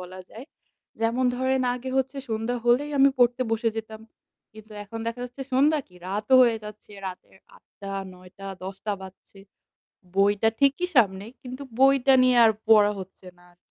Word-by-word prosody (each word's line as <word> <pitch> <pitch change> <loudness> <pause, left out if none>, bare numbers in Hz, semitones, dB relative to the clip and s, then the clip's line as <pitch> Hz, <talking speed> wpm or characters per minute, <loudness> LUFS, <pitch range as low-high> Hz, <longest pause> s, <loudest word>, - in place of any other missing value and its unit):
বলা 185 +1 -9
যায়। 230 +4 -10 0.6
যেমন 230 +3 0
ধরেন, 260 +1 0
আগে 250 +1 -6
হচ্ছে 265 +1 -1
সন্ধ্যা 225 +2 -2
হলেই 255 +5 +2
আমি 275 - +7
পড়তে 245 +1 +3
বসে 225 +1 0
যেতাম। 220 0 -7 0.5
কিন্তু 215 0 -14
এখন 225 +3 -8
দেখা 230 +1 -4
যাচ্ছে 250 +2 -8
সন্ধ্যা 290 +4 +3
কি 180 - -23
রাতও 210 +6 0
হয়ে 235 -2 +3
যাচ্ছে। 210 0 -12 0.2
রাতের 185 0 -10 0.2
৮ঃ০০ - - -21 0.2
টা, 195 0 -5 0.2
৯ঃ০০ 180 0 -16
টা, 195 - -8 0.2
১০ঃ০০ 190 +1 -6
টা 210 - 0
বাজছে। 190 +1 -14 0.8
বইটা 205 +2 +3
ঠিকই 280 +6 +2
সামনে, 200 -4 +3 0.2
কিন্তু 255 +2 -8 0.2
বইটা 270 0 +5
নিয়ে 255 -1 +4
আর 220 - +5 0.2
পড়া 210 -2 +6
হচ্ছে 185 0 -12
না 175 - -21
আরকি। 175 - -37
225 Hz, 175 wpm, -25 LUFS, 200-255 Hz, 0.8 s, আমি